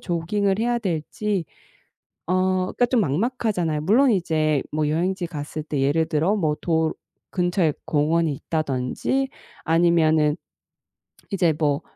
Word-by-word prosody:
조깅을 195 +3 0
해야 240 +1 +1
될지 185 +1 -2 0.8
어 180 - +1 0.3
그러니까 245 - +1
좀 245 -3 +2
막막하잖아요. 180 - 0
물론 235 - +4
이제 155 -6 +1
뭐 150 0 0
여행지 180 +3 0
갔을 155 -1 -6
때 150 -3 -3
예를 155 +4 +2
들어 165 +7 +1
뭐 155 -6 0
도 160 -2 +1 0.4
근처에 175 -4 +1
공원이 160 +1 +2
있다든지 155 - -2 0.3
아니면은 160 -2 +3 0.9
이제 175 -5 +2
뭐 145 -1 +1
165 Hz, 265 characters per minute, -23 LUFS, 155-195 Hz, 0.9 s, 물론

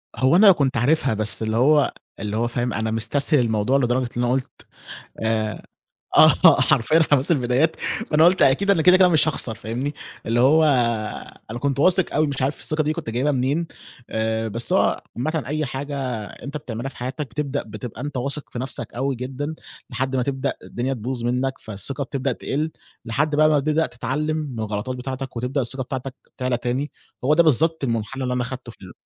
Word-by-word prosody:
هو 130 +5 +3
أنا 200 +2 +8
كنت 140 -6 +1
عارفها 135 +1 +2
بس 110 +1 -2
اللي 110 +1 -1
هو 145 +4 +4 0.3
اللي 105 0 -3
هو 120 - +1
فاهم 120 +1 -2
أنا 110 +1 -2
مستسهل 135 +6 +1
الموضوع 115 +2 +1
لدرجة 125 -1 0
اللي 120 0 0
أنا 120 - +1
قُلت 130 -1 -4 0.6
آآ، 110 -1 -1 0.6
آه، - - +7
حرفيًا 155 +9 +3
حماس 140 +3 +3
البدايات 135 +3 +2 0.4
فأنا 155 +2 +5
قُلت 185 +2 +4
أكيد 200 +10 +4
أنا 165 -5 +3
كده، 180 +2 +6
كده 185 -1 +6
مش 160 -2 +3
هاخسر 120 -7 -1
فاهمني، 125 +8 -4 0.3
اللي 115 +1 +1
هو 150 +6 +5 0.9
أنا 120 - -5
كنت 140 0 -1
واثق 185 +3 +3
أوي 155 +1 +2
مش 140 -2 -3
عارف 135 +3 0
الثقة 155 0 0
دي 155 +1 0
كنت - - -5
جايبها 130 +6 0
منين 140 +6 0 0.4
آآ، 110 0 -1
بس 115 +2 -2
هو - - +2
عامةً 155 +4 -1
أي 155 +2 -1
حاجة 140 +2 -5 0.3
أنت 140 +8 -8
بتعملها 120 -2 -5
في - - -12
حياتك 130 +4 -4
بتبدأ 140 +3 -3
بتبقى 125 -4 -8
أنت 145 -2 -4
واثق 140 +3 -2
في 120 - -6
نَفْسك 125 -3 -5
أوي 135 +2 -1
جدًا 135 +5 -5 0.3
لحد 130 +2 -2
ما 125 - +1
تبدأ 135 0 -2
الدنيا 130 +3 -3
تبوظ 120 +1 -4
منّك، 125 +2 0
فالثقة 110 +7 -4
بتبدأ 135 0 -2
تقل 155 +3 -3 0.3
لحد 145 +6 0
بقى 155 +1 +5
ما 150 - +3
بتبدأ 155 +3 +1
تتعلّم 150 +5 -2
من 140 -7 -5
الغلطات 110 +4 -3
بتاعتك 130 0 -6
وتبدأ 130 +4 -1
الثقة 130 +2 -1
بتاعتك 130 0 -5 0.2
تعلى 125 -2 0
تاني 125 +4 -2 0.3
هو 145 - +3
ده 170 +2 +5
بالضبط 160 +1 +3
المُنحنى 120 +2 -2
اللي 125 - -1
أنا 125 0 0
خدته 125 0 -7
في - - -17
ال 95 -2 -10
130 Hz, 190 wpm, -22 LUFS, 120-150 Hz, 0.9 s, أنا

